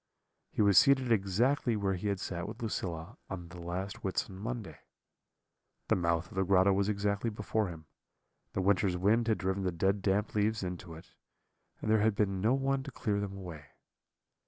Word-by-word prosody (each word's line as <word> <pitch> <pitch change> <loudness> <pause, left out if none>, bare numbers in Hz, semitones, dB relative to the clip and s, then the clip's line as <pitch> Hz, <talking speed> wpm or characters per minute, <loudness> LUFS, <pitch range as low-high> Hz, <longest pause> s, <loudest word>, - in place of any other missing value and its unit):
He - - +1
was 100 -3 +7
seated 130 -3 +4
exactly 115 +5 +2
where 100 -2 0
he 95 +3 -3
had 100 -2 0
sat 85 -2 -4
with 110 +3 -7
Lucilla 85 -6 -4
on 90 -3 -6
the 90 0 -10
last 95 +5 -4
Whitsun 95 0 -2
Monday. 105 - -5 1.1
The - - +5
mouth 85 -1 0
of - - -11
the 95 - +1
grotto 95 +1 +4
was 100 +1 +1
exactly 100 +2 0
before 105 0 -1
him; 80 -3 -9 0.7
the 95 - -1
winter's 95 -1 +2
wind 110 +6 +3
had 110 - +2
driven 95 +1 -1
the 95 -1 0
dead 95 +4 +1
damp 100 +2 +1
leaves 105 0 +1
into 90 -2 -5
it, 85 +3 -14 0.7
and 110 - +1
there 110 -1 +4
had 110 -1 +3
been 100 -3 0
no 115 +6 +3
one 135 0 0
to 140 - -7
clear 105 -4 -1
them 100 -1 -4
away. 85 -6 -8
100 Hz, 185 wpm, -32 LUFS, 90-110 Hz, 1.1 s, was